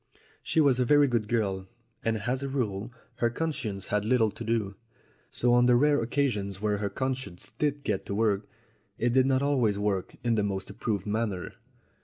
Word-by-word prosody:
She - - 0
was 140 -5 +4
a - - +4
very 145 +3 +5
good 115 -4 0
girl, 100 -5 -1 0.4
and 115 -1 +1
as 130 +4 -1
a 140 - -3
rule 115 -4 -2 0.3
her 120 - +2
conscience 115 - -3
had 105 -1 +1
little 110 -1 +3
to 115 - -8
do; 110 -3 -1 0.6
so 120 0 +2
on 120 0 +5
the 125 - +6
rare 145 +1 +4
occasions 115 -6 -1
when 105 -1 0
her 100 -1 -1
conscience 130 -9 -4
did 145 -1 0
get - - -2
to 100 - -2
work, 105 -2 +1 0.5
it 120 +1 +1
did 130 0 +4
not 135 0 +2
always 125 -8 +2
work 100 -2 -1
in 120 -1 +2
the 110 - +2
most 100 -1 -3
approved 100 -1 -2
manner. 105 -3 -2
115 Hz, 190 wpm, -28 LUFS, 100-130 Hz, 0.6 s, the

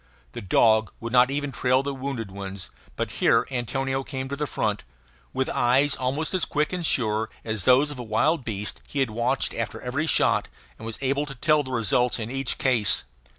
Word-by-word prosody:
The - - -7
dog 110 +3 +3
would 115 +1 -6
not 125 0 +6
even 145 0 -2
trail 130 +1 +2
the 140 0 -3
wounded 130 -6 -5
ones; 95 -1 -7 0.2
but - - -3
here - - +4
Antonio 135 +2 -2
came 130 -1 -5
to 140 - -3
the 150 +1 -3
front. 105 -5 -2 0.5
With 130 - -1
eyes 135 +4 +3
almost 140 +7 -2
as 185 - +1
quick 150 +3 0
and 180 -1 -2
sure 110 -7 0 0.2
as 110 -4 -2
those 135 +4 +5
of 140 - -8
a - - -4
wild 130 +7 +1
beast 105 -3 -3
he 145 - -4
had 130 -5 0
watched 120 +4 0
after - - -4
every 140 +6 -2
shot, - - +2 0.3
and 110 - -7
was 115 - -4
able 140 +2 0
to 135 - -7
tell 155 +4 +3
the 135 - -8
results 120 0 +1
in 115 0 -5
each 135 -1 -1
case. 120 - +2
130 Hz, 200 wpm, -25 LUFS, 115-140 Hz, 0.5 s, not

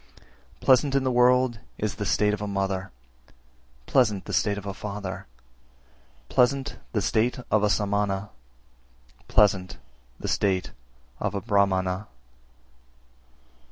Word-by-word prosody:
332. - - -13
Pleasant 135 +1 +4
in 135 - +2
the 130 - +1
world 125 -1 +3 0.2
is 105 -2 -2
the 105 - -4
state 105 +1 +2
of 105 - -3
a 105 - -3
mother, 95 -1 -2 1.0
pleasant 110 - +2
the - - -6
state 105 -2 +1
of 100 - -7
a 100 - -4
father, 100 -2 -6 1.0
pleasant 135 +2 +1
the 105 -4 0
state 110 +4 +1
of 110 - +4
a 105 - +2
Samana, 100 -1 0 1.0
pleasant 95 -5 +2 0.4
the - - -5
state 95 -2 0 0.5
of - - -2
a - - 0
Brahmana. 100 -2 +1
105 Hz, 125 wpm, -26 LUFS, 100-120 Hz, 1.0 s, Pleasant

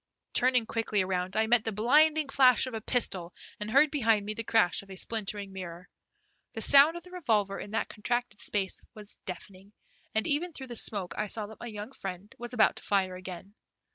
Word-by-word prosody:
Turning 250 -2 +3
quickly 220 -3 0
around 185 +1 -2
I 220 - +4
met 235 0 +3
the 220 - -2
blinding 300 +8 +3
flash 260 -2 +5
of 255 - -7
a 220 - -4
pistol, 190 -8 -1 0.2
and 210 0 -4
heard 280 +5 +5
behind 225 -8 +2
me 215 - -3
the 230 - -5
crash 220 -5 +3
of 200 - -18
a 190 - -8
splintering 205 -1 -3
mirror. 180 -1 -8 0.7
The - - -4
sound 285 +4 +6
of 345 - -9
the 360 - -14
revolver 215 - 0
in - - -7
that 220 +2 -1
contracted 240 0 -3
space 195 -2 -1
was 210 -1 -11
deafening, 190 +2 -9 0.4
and 220 - +2
even 325 +3 -1
through 265 -3 -8
the 240 - -6
smoke 195 -6 0
I 210 - 0
saw 215 +1 -2
that 220 +1 -12
my 240 - -7
young 210 +1 -7
friend 195 -3 -7
was 240 0 -6
about 220 -3 +3
to - - -7
fire 190 -2 +1
again. 185 +1 -9
215 Hz, 205 wpm, -29 LUFS, 195-245 Hz, 0.7 s, sound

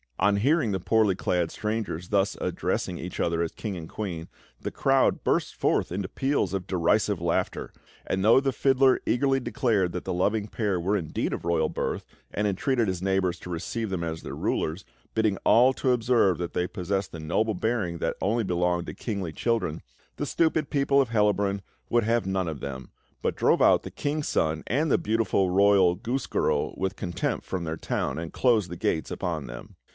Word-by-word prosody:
On 100 0 +3
hearing 135 +1 +2
the 95 - -1
poorly 105 0 +2
clad 90 -2 0
strangers 105 -6 -3
thus 100 -1 +1
addressing 90 - -2
each 90 +1 -6
other 85 0 +1
as 85 - -1
king 105 -4 -5
and 80 -2 -7
queen, 90 -6 -5 0.3
the - - -4
crowd 135 -1 +2
burst - - 0
forth - - +1
into 95 +1 -2
peals 135 -2 0
of 95 -2 -3
derisive 95 +2 +1
laughter; 85 0 -1 0.3
and 95 0 -1
though 115 +5 +7
the 135 0 0
fiddler 135 0 +3
eagerly 135 +2 +2
declared 115 -7 0
that 90 - -4
the 95 - -2
loving 105 +4 0
pair 105 -4 -1
were 100 +5 +1
indeed 80 -5 -2
of - - -4
royal 85 -2 +1
birth - - -3 0.3
and 105 - -1
entreated 115 +4 +1
his 95 -2 -2
neighbours 95 -2 0
to - - -9
receive 95 +6 -3
them 90 -3 -2
as 80 -1 -4
their - - -6
rulers, 80 +6 -2 0.3
bidding 110 -3 +2
all 125 +3 +6
to 130 0 0
observe 115 -6 +3
that 85 -1 -4
they 90 0 0
possessed 95 0 -2
the 80 - -7
noble 105 +8 0
bearing 100 -4 -1
that - - -1
only 110 +4 +1
belonged 90 -2 0
to - - -5
kingly 100 -7 -4
children, 95 -4 -1 0.4
the - - -2
stupid 160 -2 +1
people 140 -1 +3
of 130 - -1
Hellabrunn 105 -3 +1 0.3
would 120 -1 +3
have 115 -1 +1
none 95 -2 0
of 80 -3 -4
them, 65 -2 -7 0.3
but - - 0
drove - - +3
out - - +6
the - - -8
King's 145 +1 -2
Son 80 0 0
and 145 +6 +1
the - - +5
beautiful 105 -4 +1
royal 95 -1 +5
goose 120 +3 -3
girl - - 0
with 95 0 -2
contumely 85 -4 -2
from 95 -2 -4
their 80 0 -3
town, 65 -2 -2
and 80 0 -6
closed 110 -8 +2
the 85 - -5
gates 80 - -1
upon - - -3
them. - - -10
100 Hz, 195 wpm, -27 LUFS, 90-115 Hz, 0.4 s, though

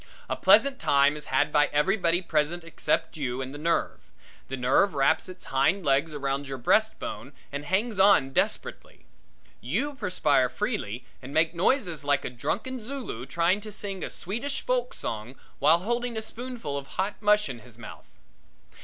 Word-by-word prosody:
A - - -1
pleasant 275 -2 +5
time 140 +1 +3
is 150 - -7
had 145 +3 +1
by 150 -1 +4
everybody 175 +3 +1
present 160 +2 0
except 165 -1 -1
you 130 -4 -2
and 135 0 -5
the 145 - -8
nerve. 165 +2 0 0.5
The 135 - -4
nerve 135 +9 +3
wraps 135 +6 +2
its 185 - -10
hind 155 +8 +1
legs 140 +3 +2
around 140 -1 -2
your 135 0 -5
breastbone 150 - 0 0.2
and 145 +1 -5
hangs 200 +5 0
on 190 -9 +5
desperately. - - -2 0.6
You 215 - -1
perspire 155 - +1
freely 125 - -3 0.2
and 135 +3 -9
make 160 +1 +3
noises 175 - +1
like 145 -1 +1
a - - -3
drunken 225 - -3
Zulu 230 - -6
trying 170 +8 +1
to 215 0 -8
sing 195 -2 -5
a - - -3
Swedish 235 +10 -3
folk 250 -1 -1
song 110 +4 -5 0.2
while 155 +4 +6
holding 240 +3 -2
a 220 - -2
spoonful 230 - -5
of 135 - -12
hot 195 +2 -1
mush 210 -1 +4
in 125 -4 -6
his 120 -1 -11
mouth. 120 - -11
165 Hz, 170 wpm, -27 LUFS, 135-210 Hz, 0.6 s, while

